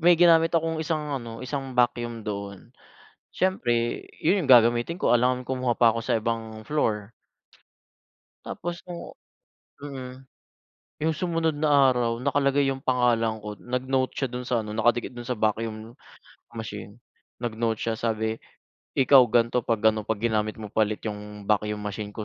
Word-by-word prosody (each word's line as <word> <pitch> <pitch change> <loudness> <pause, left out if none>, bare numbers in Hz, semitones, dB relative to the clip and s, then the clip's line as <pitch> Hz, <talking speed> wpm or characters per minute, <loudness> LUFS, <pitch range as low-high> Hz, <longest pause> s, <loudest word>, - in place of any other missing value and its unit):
may 175 +1 +6
ginamit 165 -1 +6
akong 160 0 -1
isang 155 -2 -2
ano, 115 +1 -8
isang 135 -1 -5
vacuum 120 -2 0
doon, 100 -2 -6 0.6
siyempre 120 -11 0 0.2
'yun 185 +2 +2
'yung 135 - 0
gagamitin 120 +7 +5
ko, - - +4
alangan 125 +1 +1
kumuha 130 -2 0
pa 120 0 +4
ako 115 - -3
sa - - +1
ibang 110 -1 -3
floor. 110 -8 -1 1.3
Tapos 170 0 -5
no'ng 175 -1 -7 0.8
mm. 130 -3 -7 0.9
'Yung 160 +1 +2
sumunod 165 -4 0
na 145 -3 +5
araw, 120 -1 -1
nakalagay 140 0 +2
'yung 135 0 -3
pangalan 120 -4 +1
ko, 105 -1 -6
nag-note 130 +1 -1
siya 135 - -1
do'n 125 0 -5
sa 120 -2 +1
ano, 105 - -7
nakadikit 120 +2 +1
do'n 120 -1 -9
sa 125 - -1
vacuum 110 +1 -2 0.6
machine, 105 -2 -7 0.5
nag-note 115 -1 -1
siya 115 - -1
sabi, 110 -1 -1 0.6
"Ikaw 135 0 +7
gan'to 120 +2 +2
pag-ano, 110 -1 +1
'pag 110 -1 -2
ginamit 110 -2 0
mo 105 -2 -8
pa 110 - +3
ulit 105 0 -5
'yung 105 -1 -6
vacuum 105 0 0
machine 105 0 -5
ko, 110 - -5
120 Hz, 150 wpm, -26 LUFS, 110-135 Hz, 1.3 s, Ikaw